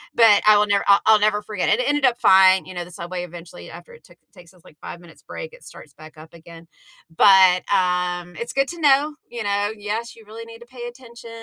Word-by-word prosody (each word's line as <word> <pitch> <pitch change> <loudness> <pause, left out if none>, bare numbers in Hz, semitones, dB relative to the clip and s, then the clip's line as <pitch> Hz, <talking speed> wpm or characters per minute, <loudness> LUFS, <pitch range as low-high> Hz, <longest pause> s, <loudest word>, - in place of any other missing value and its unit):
but 225 -3 +5
I 215 -1 +6
will 210 - +2
never, 200 -1 0
uh, 200 - +6
I'll 220 -1 +4
never 210 0 0
forget 210 -3 -4
it, - - +3
and 230 - 0
it 250 - -2
ended 290 -1 0
up 240 -1 -2
fine, 190 0 +4
you 185 - -11
know, 175 -1 -6
the 175 - -15
subway 175 +1 -7
eventually 175 +1 -13
after 480 - -14
it 475 - -18
took - - -22 0.2
takes 180 -2 -18
its, 180 -3 -25
like, 150 - -20
5 - - -10
minutes 170 -2 -18
break, 485 -1 -9
it - - -17
starts 150 - -15
back 155 +2 -16
up 155 +1 -15
again, 165 0 -15 0.5
but, 190 -1 +4
um, 180 -1 -2
it's 235 - -7
good 275 0 0
to 345 - -9
know, 295 +1 +2
you 235 -2 -7
know, 205 0 -2
yes, 215 +3 -6
you 225 - -18
really 225 +2 -11
need 230 0 -14
to 235 - -15
pay 240 -1 -10
attention 235 -1 -14
205 Hz, 250 wpm, -20 LUFS, 180-235 Hz, 0.5 s, I